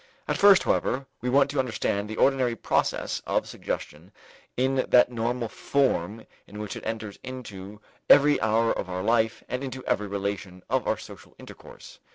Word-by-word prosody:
At - - 0
first, 200 -2 +6
however, 135 +1 0 0.2
we 125 - -2
want 140 +2 +3
to 145 - -2
understand 105 -5 -1
the 110 - -5
ordinary 130 -3 +2
process - - -1
of - - 0
suggestion 80 +6 -6 0.5
in 130 +1 +1
that 125 0 +5
normal 120 0 -2
form 110 -5 -1 0.2
in 105 - -11
which 105 -1 -5
it - - -8
enters 110 -2 -5
into 105 -6 -9 0.3
every 145 +1 +6
hour 110 +1 +2
of 95 - -5
our 90 0 -3
life 115 0 +1
and 125 +2 -4
into 130 -1 -6
every 105 - 0
relation 100 -2 -4
of - - +1
our - - +1
social - - -13
intercourse. - - -13
115 Hz, 170 wpm, -26 LUFS, 100-130 Hz, 0.5 s, first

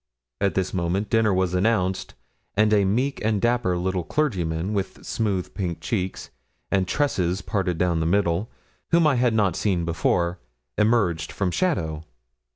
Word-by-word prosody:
At 100 - +1
this 95 -1 -1
moment 95 +3 -1
dinner 115 -2 +3
was 95 -1 +1
announced, 95 -1 0 0.4
and 105 0 +4
a 100 -2 +4
meek 125 +8 0
and 105 -1 +1
dapper 120 -6 +1
little 90 0 -1
clergyman, 90 - -1
with 100 -2 -3
smooth 100 -5 -2
pink 85 -4 -3
cheeks, 95 +2 -3 0.4
and 95 -2 +2
tresses 95 -9 0
parted 95 -4 -1
down 85 -1 +1
the 80 - 0
middle, 95 +2 +1 0.4
whom 170 -1 +4
I 145 -4 +3
had 120 -2 +2
not 100 -6 +2
seen 90 -5 0
before, 85 +1 0 0.4
emerged 105 -7 +1
from 95 -3 -1
shadow. 80 - -1
95 Hz, 155 wpm, -24 LUFS, 90-110 Hz, 0.4 s, and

